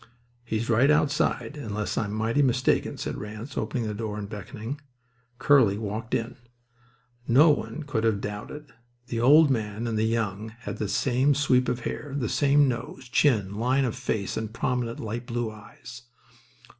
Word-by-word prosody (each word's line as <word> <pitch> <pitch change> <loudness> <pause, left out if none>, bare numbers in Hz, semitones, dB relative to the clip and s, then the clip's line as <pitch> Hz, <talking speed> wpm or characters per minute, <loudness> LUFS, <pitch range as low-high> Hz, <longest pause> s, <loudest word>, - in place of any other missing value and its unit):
"He's 115 0 -2
right 120 +4 +4
outside, 150 0 +1
unless 105 -6 -3
I'm 105 -2 -1
mighty 110 +6 +1
mistaken," 125 -2 +1
said - - -4
Ranse, 105 +5 -7
opening 120 -3 -2
the 105 - -3
door 105 0 -4
and 105 -1 -5
beckoning. 110 +7 -7 0.6
Curly 130 -7 +4
walked 110 +1 -3
in. 115 +3 -3 0.9
No 145 +7 +6
one 155 +1 -3
could 130 -7 -2
have 110 -3 +2
doubted. 120 +9 -7 0.4
The 115 - -2
old 145 +4 +7
man 110 -2 -2
and 115 -2 -1
the - - +2
young 110 -1 -2
had - - -5
the 105 - -2
same 135 +4 +2
sweep 130 -3 +2
of 120 - -2
hair, 140 +3 -5
the 120 -6 -1
same 145 0 +4
nose, 125 +1 -5
chin, 110 -9 +2
line 130 +3 +2
of 120 - -2
face, 110 -6 -2
and 110 -1 -3
prominent 120 0 -2
light 115 +2 -5
blue 120 -1 -2
eyes. 110 +3 -12
115 Hz, 165 wpm, -26 LUFS, 110-135 Hz, 0.9 s, old